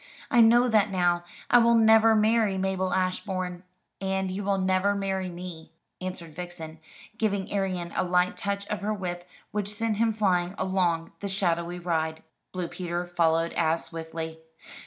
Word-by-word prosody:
I 240 Hz, -, +6 dB
know 240 Hz, +2 st, +6 dB
that 215 Hz, -3 st, +3 dB
now. 175 Hz, -2 st, +1 dB, 0.3 s
I 245 Hz, -, +8 dB
will 235 Hz, 0 st, +5 dB
never 225 Hz, 0 st, +6 dB
marry 215 Hz, -2 st, +3 dB
Mabel 190 Hz, -1 st, -1 dB
Ashbourne." 185 Hz, -1 st, -2 dB, 0.4 s
"And 190 Hz, -1 st, -1 dB
you 195 Hz, +2 st, -4 dB
will 195 Hz, 0 st, +1 dB
never 190 Hz, +1 st, +2 dB
marry 190 Hz, -2 st, -2 dB
me," 175 Hz, -2 st, -9 dB, 0.3 s
answered 180 Hz, -3 st, -6 dB
Vixen, 165 Hz, -2 st, -8 dB, 0.4 s
giving 200 Hz, -3 st, -1 dB
Arion 185 Hz, -3 st, -2 dB
a -, -, +1 dB
light 180 Hz, 0 st, +2 dB
touch 200 Hz, 0 st, -3 dB
of 210 Hz, -, -3 dB
her 215 Hz, +1 st, -1 dB
whip 180 Hz, -2 st, -5 dB, 0.2 s
which 205 Hz, -1 st, -2 dB
sent 215 Hz, 0 st, -1 dB
him 225 Hz, +1 st, +3 dB
flying 185 Hz, -4 st, +1 dB
along 180 Hz, -3 st, 0 dB
the 200 Hz, -, -4 dB
shadowy 175 Hz, -2 st, -1 dB
ride. 160 Hz, -2 st, -2 dB, 0.3 s
Blue 180 Hz, -2 st, -3 dB
Peter 175 Hz, 0 st, -4 dB
followed 165 Hz, -1 st, +1 dB
as 165 Hz, 0 st, +1 dB
swiftly. 160 Hz, -1 st, -6 dB
185 Hz, 155 wpm, -27 LUFS, 175-200 Hz, 0.4 s, I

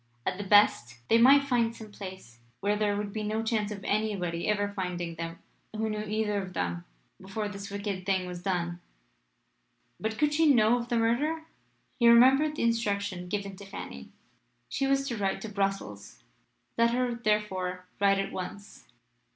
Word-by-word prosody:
At 185 Hz, -, -2 dB
the -, -, -2 dB
best, 195 Hz, -, +4 dB
they 230 Hz, -, +5 dB
might 275 Hz, +4 st, +7 dB
find 235 Hz, -4 st, +1 dB
some 220 Hz, -2 st, -11 dB
place 185 Hz, -, -10 dB, 0.2 s
where 205 Hz, +1 st, +1 dB
there 205 Hz, -1 st, 0 dB
would 205 Hz, -1 st, -4 dB
be 215 Hz, -, -3 dB
no 215 Hz, +1 st, -1 dB
chance 220 Hz, -2 st, 0 dB
of 200 Hz, -2 st, -7 dB
anybody 195 Hz, -5 st, -1 dB
ever 205 Hz, -1 st, +1 dB
finding 180 Hz, -4 st, -4 dB
them 165 Hz, 0 st, -6 dB, 0.4 s
who 220 Hz, 0 st, -1 dB
knew 210 Hz, 0 st, -2 dB
either 210 Hz, -1 st, -1 dB
of 185 Hz, -1 st, -8 dB
them 85 Hz, -, -2 dB, 0.4 s
before 210 Hz, +3 st, -4 dB
this 200 Hz, 0 st, -7 dB
wicked 200 Hz, -2 st, -4 dB
thing 190 Hz, -1 st, 0 dB
was 180 Hz, -1 st, -7 dB
done. 175 Hz, -2 st, -2 dB, 1.2 s
But 220 Hz, 0 st, -3 dB
could 295 Hz, +1 st, +2 dB
she 320 Hz, +1 st, +4 dB
know 235 Hz, -1 st, +4 dB
of 240 Hz, 0 st, -6 dB
the 240 Hz, -, +1 dB
murder? 285 Hz, +8 st, +1 dB, 0.6 s
He 235 Hz, -1 st, +6 dB
remembered 265 Hz, +6 st, +6 dB
the -, -, -2 dB
instruction 200 Hz, -5 st, 0 dB
given 200 Hz, 0 st, -3 dB
to 200 Hz, -, -10 dB
Fanny. 195 Hz, -, -8 dB, 0.6 s
She 275 Hz, -, 0 dB
was 275 Hz, 0 st, +1 dB
to 235 Hz, -, -3 dB
write 195 Hz, -1 st, -1 dB
to 220 Hz, -, -5 dB
Brussels. 195 Hz, -, -3 dB, 0.6 s
Let 235 Hz, 0 st, +5 dB
her 250 Hz, -1 st, 0 dB
therefore 210 Hz, -5 st, -1 dB
write 200 Hz, -1 st, +4 dB
at 195 Hz, 0 st, -2 dB
once. 195 Hz, +2 st, -8 dB
205 Hz, 175 wpm, -29 LUFS, 190-230 Hz, 1.2 s, might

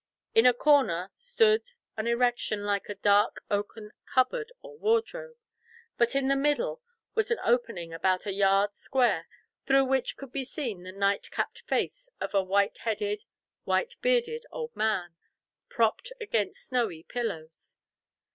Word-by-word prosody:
In 225 Hz, +2 st, +6 dB
a 250 Hz, -, +7 dB
corner 245 Hz, -, +3 dB
stood 460 Hz, -3 st, +3 dB, 0.3 s
an 220 Hz, +1 st, -3 dB
erection 235 Hz, -3 st, +1 dB
like 205 Hz, 0 st, -1 dB
a 205 Hz, -, -4 dB
dark 205 Hz, +1 st, +3 dB
oaken 210 Hz, +1 st, -3 dB, 0.2 s
cupboard 435 Hz, -, +1 dB
or -, -, -11 dB
wardrobe, 460 Hz, +2 st, -1 dB, 0.6 s
but 235 Hz, +2 st, +2 dB
in 275 Hz, -1 st, +2 dB
the 275 Hz, -, +3 dB
middle 295 Hz, -, 0 dB, 0.3 s
was 440 Hz, -1 st, +1 dB
an 465 Hz, -, +1 dB
opening 230 Hz, -9 st, 0 dB
about 185 Hz, +2 st, +1 dB
a 200 Hz, -, -2 dB
yard 195 Hz, +1 st, +3 dB
square 235 Hz, -9 st, +1 dB, 0.4 s
through 270 Hz, 0 st, +5 dB
which 265 Hz, -1 st, 0 dB
could 275 Hz, -2 st, -10 dB
be 275 Hz, 0 st, -2 dB
seen 245 Hz, -, -5 dB
the 185 Hz, +1 st, -8 dB
night 200 Hz, +1 st, 0 dB
capped -, -, -3 dB
face -, -, -1 dB
of -, -, -4 dB
a 200 Hz, -, +4 dB
white 195 Hz, +2 st, +1 dB
headed, 415 Hz, -, -2 dB, 0.4 s
white 485 Hz, 0 st, 0 dB
bearded 480 Hz, -1 st, +1 dB
old 470 Hz, -1 st, -6 dB
man, 190 Hz, -6 st, 0 dB, 0.6 s
propped 230 Hz, -, 0 dB
against 230 Hz, -, -2 dB
snowy 225 Hz, -11 st, -1 dB
pillows. 165 Hz, -10 st, -5 dB
245 Hz, 145 wpm, -28 LUFS, -, 0.6 s, a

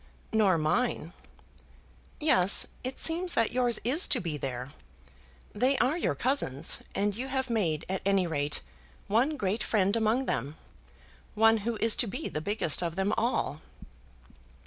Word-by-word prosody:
"Nor 205 Hz, -5 st, +3 dB
mine." 165 Hz, +2 st, -1 dB, 1.1 s
"Yes; 200 Hz, -, +4 dB, 0.2 s
it 255 Hz, +1 st, -5 dB
seems 345 Hz, +2 st, +2 dB
that 230 Hz, -, +2 dB
yours 245 Hz, -2 st, +1 dB
is 275 Hz, +9 st, +3 dB
to 260 Hz, -, +1 dB
be 165 Hz, -6 st, -4 dB
there. 130 Hz, -2 st, -5 dB, 0.8 s
They 260 Hz, +5 st, +1 dB
are 265 Hz, +5 st, +1 dB
your 345 Hz, -, -1 dB
cousins, 170 Hz, -, +2 dB
and 205 Hz, 0 st, 0 dB
you 255 Hz, +4 st, -5 dB
have 265 Hz, -1 st, -2 dB
made 165 Hz, -9 st, -1 dB
at 190 Hz, 0 st, -3 dB
any 195 Hz, -1 st, +2 dB
rate 150 Hz, -3 st, -2 dB, 0.4 s
one 250 Hz, +9 st, +1 dB
great 200 Hz, 0 st, -2 dB
friend 200 Hz, -1 st, +1 dB
among 230 Hz, +4 st, +1 dB
them, 135 Hz, -, -3 dB, 0.8 s
one 225 Hz, +1 st, +5 dB
who 225 Hz, +2 st, -3 dB
is 225 Hz, 0 st, +1 dB
to 240 Hz, -, +1 dB
be 195 Hz, -, -4 dB
the 155 Hz, -, -4 dB
biggest 195 Hz, -3 st, 0 dB
of 170 Hz, -2 st, -3 dB
them 195 Hz, +3 st, 0 dB
all." 230 Hz, -, -1 dB
215 Hz, 150 wpm, -28 LUFS, 170-250 Hz, 1.1 s, one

